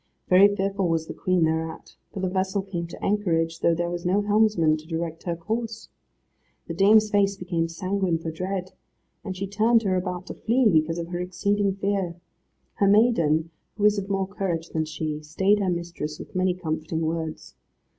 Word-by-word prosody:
Very 185 Hz, +2 st, +8 dB
fearful 195 Hz, -1 st, 0 dB
was 165 Hz, -1 st, 0 dB
the -, -, -7 dB
Queen 185 Hz, -2 st, +1 dB
thereat, 160 Hz, 0 st, -2 dB, 0.2 s
for 195 Hz, -, -5 dB
the 190 Hz, -, 0 dB
vessel 190 Hz, +1 st, -1 dB
came 175 Hz, -3 st, -4 dB
to 170 Hz, -, -7 dB
anchorage, 165 Hz, -5 st, 0 dB
though 170 Hz, -, +3 dB
there 175 Hz, +1 st, -2 dB
was 175 Hz, 0 st, -4 dB
no 195 Hz, +3 st, +2 dB
helmsman 205 Hz, -7 st, +3 dB
to 155 Hz, +1 st, -13 dB
direct 165 Hz, -1 st, -4 dB
her 170 Hz, -2 st, -1 dB
course. 225 Hz, +6 st, -4 dB, 0.8 s
The 165 Hz, -, -4 dB
dame's 210 Hz, +4 st, +5 dB
face 200 Hz, -1 st, +2 dB
became 175 Hz, -3 st, -1 dB
sanguine 185 Hz, 0 st, -1 dB
for 160 Hz, 0 st, -5 dB
dread, 185 Hz, +2 st, -4 dB, 0.5 s
and 190 Hz, -2 st, -5 dB
she 195 Hz, -, -2 dB
turned 220 Hz, +4 st, +3 dB
her 190 Hz, -2 st, +1 dB
about 180 Hz, -1 st, -3 dB
to -, -, -7 dB
flee, 240 Hz, +2 st, +2 dB
because 165 Hz, -3 st, +2 dB
of 170 Hz, 0 st, -4 dB
her 175 Hz, 0 st, -3 dB
exceeding 200 Hz, +2 st, 0 dB
fear. 195 Hz, -3 st, -1 dB, 0.6 s
Her 200 Hz, -, +2 dB
maiden, 170 Hz, -7 st, +3 dB, 0.3 s
who 205 Hz, -, -3 dB
was 210 Hz, 0 st, +4 dB
of 200 Hz, 0 st, -6 dB
more 195 Hz, -1 st, 0 dB
courage 185 Hz, -4 st, -3 dB
than 160 Hz, -1 st, -1 dB
she, 155 Hz, 0 st, -4 dB
stayed 190 Hz, +7 st, +2 dB
her 195 Hz, -2 st, 0 dB
mistress 170 Hz, -3 st, -4 dB
with -, -, -11 dB
many 185 Hz, -1 st, +1 dB
comforting 160 Hz, -2 st, -3 dB
words. 160 Hz, 0 st, -3 dB
185 Hz, 185 wpm, -25 LUFS, 165-200 Hz, 0.8 s, Very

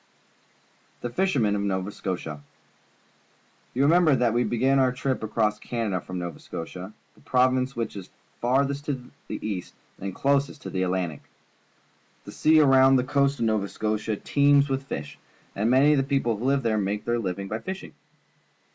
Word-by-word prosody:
The 120 Hz, -, -4 dB
Fishermen 125 Hz, -, +1 dB
of 100 Hz, -, -1 dB
Nova 95 Hz, 0 st, -1 dB
Scotia. 80 Hz, -7 st, -5 dB, 0.7 s
— -, -, -36 dB
You 135 Hz, -, +2 dB
remember 160 Hz, 0 st, +5 dB
that 120 Hz, -3 st, +2 dB
we 120 Hz, +1 st, +2 dB
began 130 Hz, +4 st, +2 dB
our 130 Hz, -1 st, +3 dB
trip 130 Hz, +1 st, -2 dB
across 105 Hz, -1 st, 0 dB
Canada 110 Hz, -7 st, -2 dB
from 95 Hz, 0 st, -7 dB
Nova 85 Hz, -3 st, -5 dB
Scotia 90 Hz, +4 st, -7 dB
— -, -, -39 dB
the -, -, -23 dB
province 130 Hz, +1 st, +2 dB
which 115 Hz, -2 st, -3 dB
is 95 Hz, -3 st, -8 dB, 0.3 s
farthest 140 Hz, +3 st, +1 dB
to 130 Hz, -4 st, -4 dB, 0.2 s
the -, -, -5 dB
east 95 Hz, -4 st, -5 dB, 0.2 s
and 95 Hz, -1 st, -5 dB
closest 140 Hz, +1 st, 0 dB
to -, -, -6 dB
the 95 Hz, -, -1 dB
Atlantic. 90 Hz, -4 st, -1 dB, 1.0 s
The -, -, -8 dB
sea 155 Hz, 0 st, +4 dB
around 135 Hz, -1 st, +6 dB
the 125 Hz, -, +3 dB
coast 140 Hz, +1 st, +1 dB
of 115 Hz, -, 0 dB
Nova 110 Hz, -3 st, +1 dB
Scotia 110 Hz, 0 st, -2 dB
teems 140 Hz, +4 st, +3 dB
with 135 Hz, 0 st, -2 dB
fish, 75 Hz, -, -6 dB, 0.4 s
and 105 Hz, +4 st, +1 dB
many 135 Hz, +4 st, +5 dB
of 150 Hz, -, +4 dB
the -, -, +2 dB
people 135 Hz, -4 st, 0 dB
who 110 Hz, +4 st, -5 dB
live 135 Hz, 0 st, +2 dB
there 110 Hz, -2 st, +1 dB
make 105 Hz, +1 st, -2 dB
their 120 Hz, 0 st, 0 dB
li\ 95 Hz, -5 st, -2 dB
ing 100 Hz, 0 st, -5 dB
by 110 Hz, +3 st, -3 dB
fishing. 190 Hz, +6 st, -7 dB
120 Hz, 180 wpm, -26 LUFS, 100-135 Hz, 1.0 s, around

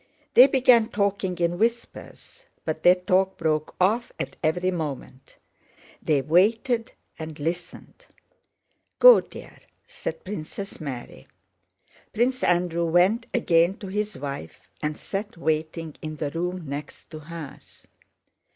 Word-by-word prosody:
They 255 Hz, +1 st, +9 dB
began 250 Hz, -4 st, +4 dB
talking 200 Hz, -3 st, -1 dB
in 175 Hz, 0 st, 0 dB
whispers, 235 Hz, -, -4 dB, 0.2 s
but 155 Hz, 0 st, -3 dB
their 180 Hz, +2 st, +7 dB
talk 185 Hz, +1 st, +1 dB
broke 155 Hz, -1 st, -1 dB
off 215 Hz, +6 st, +2 dB
at -, -, -5 dB
every 180 Hz, +4 st, +1 dB
moment. 145 Hz, -6 st, -6 dB, 0.6 s
They 145 Hz, -4 st, +1 dB
waited 225 Hz, -, +2 dB, 0.3 s
and 155 Hz, -1 st, -7 dB
listened. 175 Hz, -, -6 dB, 0.9 s
"Go, -, -, +9 dB
dear," -, -, -13 dB, 0.3 s
said -, -, -6 dB
Princess 195 Hz, 0 st, -7 dB
Mary. 125 Hz, -, -7 dB, 0.9 s
Prince 255 Hz, +3 st, +1 dB
Andrew 175 Hz, -1 st, +1 dB
went 180 Hz, +8 st, +3 dB
again 175 Hz, -5 st, +2 dB
to -, -, -9 dB
his 210 Hz, +2 st, -3 dB
wife 140 Hz, -, -7 dB
and 150 Hz, 0 st, -2 dB
sat 205 Hz, 0 st, -5 dB
waiting 160 Hz, 0 st, -2 dB
in 155 Hz, 0 st, -5 dB
the 150 Hz, -2 st, -3 dB
room 180 Hz, +1 st, -3 dB
next 140 Hz, +4 st, -8 dB
to 155 Hz, -, -7 dB
hers. 155 Hz, -1 st, -11 dB
175 Hz, 125 wpm, -25 LUFS, 155-205 Hz, 0.9 s, They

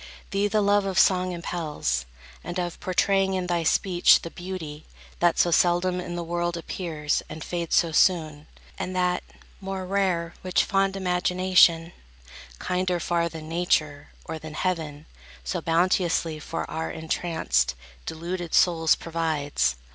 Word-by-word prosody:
Thee 200 Hz, 0 st, +1 dB
the 210 Hz, 0 st, +1 dB
love 205 Hz, 0 st, +3 dB
of 190 Hz, -2 st, -2 dB
song 185 Hz, -1 st, +4 dB
Impels, 160 Hz, -, -2 dB, 0.4 s
and 175 Hz, +1 st, -5 dB
of 175 Hz, -1 st, -4 dB
portraying 190 Hz, +1 st, +1 dB
in 185 Hz, -1 st, -1 dB
thy 175 Hz, -1 st, 0 dB
speech 175 Hz, +2 st, +4 dB
The 170 Hz, -, -6 dB
beauty, 170 Hz, -5 st, -7 dB, 0.3 s
that 175 Hz, -1 st, +3 dB
so 175 Hz, -, +3 dB
seldom 175 Hz, +2 st, +2 dB
in 175 Hz, -1 st, -6 dB
the 175 Hz, -, -3 dB
world 175 Hz, 0 st, -2 dB
Appears 160 Hz, -3 st, -2 dB
and 155 Hz, 0 st, -7 dB
fades 170 Hz, -2 st, -2 dB
so 170 Hz, -1 st, +3 dB
soon, 155 Hz, -3 st, +2 dB, 0.3 s
and 185 Hz, -, -4 dB
that, 180 Hz, 0 st, +1 dB, 0.4 s
more 195 Hz, -1 st, -5 dB
rare 185 Hz, -3 st, 0 dB
Which 185 Hz, -1 st, +2 dB
fond 195 Hz, 0 st, +1 dB
imagination, 180 Hz, -2 st, +3 dB, 0.7 s
kinder 180 Hz, -, -1 dB
far 170 Hz, 0 st, 0 dB
Than 160 Hz, -1 st, -9 dB
Nature, 155 Hz, -4 st, 0 dB, 0.2 s
or 160 Hz, -1 st, -5 dB
than 155 Hz, 0 st, -9 dB
heaven, 160 Hz, -5 st, -2 dB, 0.4 s
so 180 Hz, -, -3 dB
bounteously 165 Hz, -1 st, +1 dB
For 165 Hz, -, -4 dB
our 160 Hz, 0 st, -4 dB
entranced, 160 Hz, -, -1 dB, 0.3 s
deluded 170 Hz, +1 st, -4 dB
souls 165 Hz, -3 st, +4 dB
provides. 155 Hz, -, -1 dB
175 Hz, 140 wpm, -25 LUFS, 160-185 Hz, 0.7 s, song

